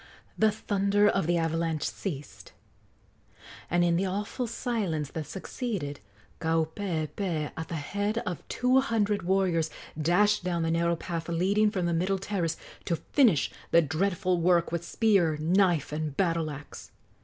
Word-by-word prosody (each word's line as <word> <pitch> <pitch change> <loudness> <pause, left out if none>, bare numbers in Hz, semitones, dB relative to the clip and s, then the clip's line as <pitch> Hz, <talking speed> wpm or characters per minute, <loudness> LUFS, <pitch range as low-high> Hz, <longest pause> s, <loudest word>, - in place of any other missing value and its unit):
The 220 - +4
thunder 205 -1 +2
of 195 -5 +1
the 175 0 +2
avalanche 165 -1 0
ceased, 150 -8 -6 1.2
and 175 0 +3
in 170 -1 +3
the 190 +2 +1
awful 205 +6 -3
silence 200 - -2
that 155 -3 -5
succeeded 185 - -4 0.4
Kaupeepee, 160 0 -1
at 160 0 -5
the 165 - -4
head 205 +8 -2
of 180 - -3
two 255 +1 +3
hundred 215 -6 +1
warriors, 180 -3 +1 0.3
dashed 200 +6 +3
down 175 -2 -1
the 165 - 0
narrow 170 +1 +2
path 165 0 -5
leading 195 +5 +2
from 185 -4 -2
the 170 - +1
middle 185 +4 +1
terrace 190 -4 -2 0.3
to 170 - +1
finish 215 - +2 0.2
the 170 0 +5
dreadful 180 +3 0
work 170 -1 +3
with 170 0 -2
spear, 175 -5 +2
knife 170 -1 +2
and 150 -1 -3
battle 165 -4 +1
axe. 145 0 -9
175 Hz, 145 wpm, -28 LUFS, 160-200 Hz, 1.2 s, the